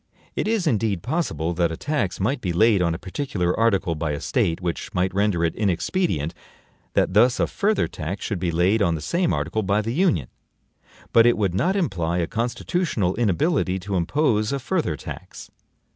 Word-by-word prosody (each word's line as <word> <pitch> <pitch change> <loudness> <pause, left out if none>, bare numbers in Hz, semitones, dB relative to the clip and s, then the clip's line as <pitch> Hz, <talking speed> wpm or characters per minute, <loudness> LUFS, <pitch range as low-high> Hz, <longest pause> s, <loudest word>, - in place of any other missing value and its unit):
It - - -1
is, 220 -4 +1
indeed, 110 - 0
possible 85 - -1
that 85 -1 +1
a 80 - -5
tax 140 - -2
might 125 +7 0
be 90 - -1
laid 105 +2 +4
on 85 -2 +1
a - - -4
particular 95 - -2
article 100 -6 +2
by 75 -1 -2
a 70 - -3
State 80 +1 0
which 90 -2 -4
might 90 +1 +1
render 100 -3 +1
it 80 - 0
INEXPEDIENT 95 - 0 0.6
that - - +2
thus 120 +4 +4
a - - +3
further 210 +1 0
tax 85 +6 -5
should 100 - -2
be 85 - -1
laid 90 +6 +2
on 85 -4 +2
the - - -4
same 170 - 0
article 110 - -1
by 100 +1 +1
the 115 +2 -2
Union; 155 - +1 0.8
but 115 0 +7
it 120 - +3
would 100 -5 0
not 180 - +1
imply 90 - 0
a 85 - +1
constitutional 120 - -1
inability 115 - +1
to 95 +1 -4
impose 110 - +1
a 140 - 0
further 145 - -1
tax. - - -9
100 Hz, 190 wpm, -23 LUFS, 85-125 Hz, 0.8 s, but